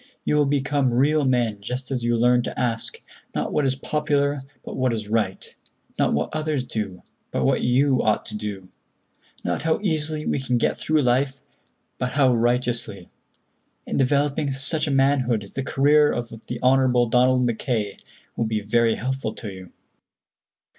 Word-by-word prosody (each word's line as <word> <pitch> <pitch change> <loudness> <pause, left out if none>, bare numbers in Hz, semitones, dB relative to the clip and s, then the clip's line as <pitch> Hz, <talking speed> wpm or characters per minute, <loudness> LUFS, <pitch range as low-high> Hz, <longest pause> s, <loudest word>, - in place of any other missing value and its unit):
You - - +1
will 145 -1 +3
become 140 -1 +1
real 145 +3 +3
men 120 -5 +1
just 125 +5 -5
as 125 -3 -2
you 120 0 +1
learn 125 +1 +4
to - - -5
ask, 115 -2 -1 0.4
not - - -2
what 150 -2 +2
is 130 - 0
popular, 145 0 0 0.2
but - - -6
what 130 -2 +1
is 110 -2 -4
right; 105 -3 -1 0.5
not - - +3
what 75 +2 -1
others 155 -3 -1
do, 105 -7 -5 0.3
but - - -1
what - - +2
you 130 +2 +3
ought 110 -1 +1
to 105 - -6
do; 100 -3 -6 0.7
not - - -1
how 160 0 +1
easily 155 -4 0
we - - 0
can 125 -2 0
get - - +1
through 155 -2 +1
life, 135 +2 +1 0.6
but 125 0 -2
how 135 -3 +4
righteously. 120 -5 -1 0.8
In - - -3
developing 140 +2 +1
such 145 +4 +1
a - - -1
manhood 130 -7 +1
the 135 - -2
career 145 +2 +3
of 120 -1 -3 0.3
Hon. 130 0 +4 0.2
Donald 125 +1 +4
Mackay 115 -3 -2 0.4
will 115 - 0
be 110 -1 -1
very 115 +2 +2
helpful 130 -3 -3
to 105 -4 -6
you. 95 -2 -11
125 Hz, 165 wpm, -23 LUFS, 115-140 Hz, 0.8 s, learn